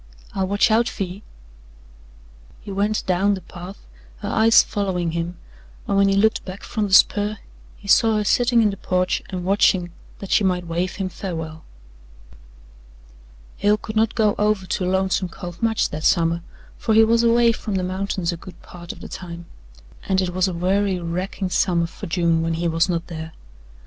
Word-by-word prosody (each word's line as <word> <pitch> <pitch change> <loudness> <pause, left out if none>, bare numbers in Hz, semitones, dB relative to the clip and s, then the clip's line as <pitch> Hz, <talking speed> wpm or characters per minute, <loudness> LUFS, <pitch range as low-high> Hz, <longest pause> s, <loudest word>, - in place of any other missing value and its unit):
I'll 190 -1 -1
watch 205 +4 +2
out 230 +2 +3
fer 200 - -3
ye." 185 +2 -7 1.4
He 205 - -8
went 205 +2 0
down 195 +2 +2
the 190 - -8
path, 180 +2 -11 0.3
her - - -5
eyes 225 +1 +5
following 185 -5 -2
him, 170 +1 -3 0.5
and - - 0
when 200 0 +4
he 195 - +2
looked 220 +2 +2
back 185 +1 -9
from 215 -3 -2
the 190 - -5
spur 210 +1 +4 0.4
he 200 - -14
saw 225 +2 +5
her 210 - +1
sitting 240 +3 +3
in 210 - +3
the 195 - -7
porch 185 -1 0
and 180 -2 -5
watching 190 -2 +2 0.3
that 195 - -8
she - - +4
might 180 -2 0
wave 170 +2 -2
him 195 -2 -2
farewell. 160 -4 -6 1.9
Hale 205 +1 +3
could 215 0 -8
not 220 +1 +2
go 215 -2 +3
over 210 -2 +1
to 180 0 -1
Lonesome 190 -1 0
Cove 175 +2 -9
much 225 -1 +1
that 155 +1 -5
summer, 170 -2 +2 0.4
for 220 - +1
he 225 - +7
was 230 +1 +3
away 235 0 +4
from 210 -2 -4
the 185 - 0
mountains 185 -1 -2
a 170 - -5
good 180 +2 -13
part 175 -1 -9
of 175 - -13
the - - -8
time, 170 -2 -8 0.6
and 190 -1 +3
it 185 -1 -1
was 185 +1 +2
a 185 - -3
weary, 190 +2 +1
racking 180 +2 -3
summer 175 -2 +2
for 165 - -8
June 170 -1 +1
when 165 0 -1
he 170 +1 -1
was 165 +2 +1
not 170 -1 -1
there. 160 -1 -7
190 Hz, 190 wpm, -22 LUFS, 175-205 Hz, 1.9 s, he